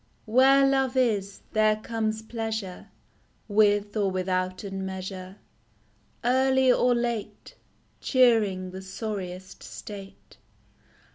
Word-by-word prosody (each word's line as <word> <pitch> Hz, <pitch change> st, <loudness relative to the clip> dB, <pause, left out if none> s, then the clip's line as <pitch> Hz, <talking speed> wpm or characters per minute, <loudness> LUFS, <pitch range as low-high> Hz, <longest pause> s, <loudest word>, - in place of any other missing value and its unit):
Where 265 Hz, +4 st, +5 dB
love 270 Hz, -1 st, +1 dB
is, 205 Hz, -6 st, 0 dB
there 215 Hz, 0 st, +3 dB
comes 220 Hz, 0 st, -3 dB
pleasure, 220 Hz, -4 st, -5 dB, 0.6 s
With 205 Hz, -1 st, +2 dB
or 205 Hz, -2 st, +1 dB
withouten 185 Hz, +1 st, -2 dB
measure 190 Hz, 0 st, -6 dB, 0.9 s
Early 260 Hz, +1 st, +4 dB
or 245 Hz, 0 st, +3 dB
late 235 Hz, -3 st, -4 dB, 0.5 s
Cheering 215 Hz, -8 st, +2 dB
the 190 Hz, +1 st, -7 dB
sorriest 190 Hz, -2 st, -6 dB
state. 200 Hz, -2 st, -10 dB
215 Hz, 90 wpm, -26 LUFS, 190-240 Hz, 0.9 s, Where